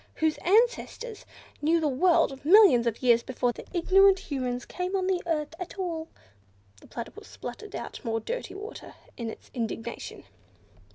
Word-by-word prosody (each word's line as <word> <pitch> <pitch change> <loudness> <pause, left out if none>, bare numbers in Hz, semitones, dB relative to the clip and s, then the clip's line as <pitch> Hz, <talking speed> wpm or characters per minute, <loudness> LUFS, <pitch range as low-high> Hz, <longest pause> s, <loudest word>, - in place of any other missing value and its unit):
whose 315 -1 0
ancestors 460 +2 +1 0.3
knew 325 +3 +3
the 315 - +1
world 295 -1 +2
millions 330 - +7
of 230 +2 -2
years 235 -2 +5
before 245 0 -1
the - - -11
ignorant 385 +2 +5
Humans 255 -9 -3
came 365 +1 -3
on 375 -1 0
the 370 -1 +1
earth 305 -2 -1
at 365 +2 -7
all!" 335 -4 -3 0.7
The - - -17
Platypus 390 - -8
spluttered 425 -1 -8
out - - -7
more 225 -2 -1
dirty 485 - -5
water, 420 +3 -9 0.2
in 235 -2 -4
its - - -11
indignation. 230 -1 -5
330 Hz, 155 wpm, -27 LUFS, 250-390 Hz, 0.7 s, millions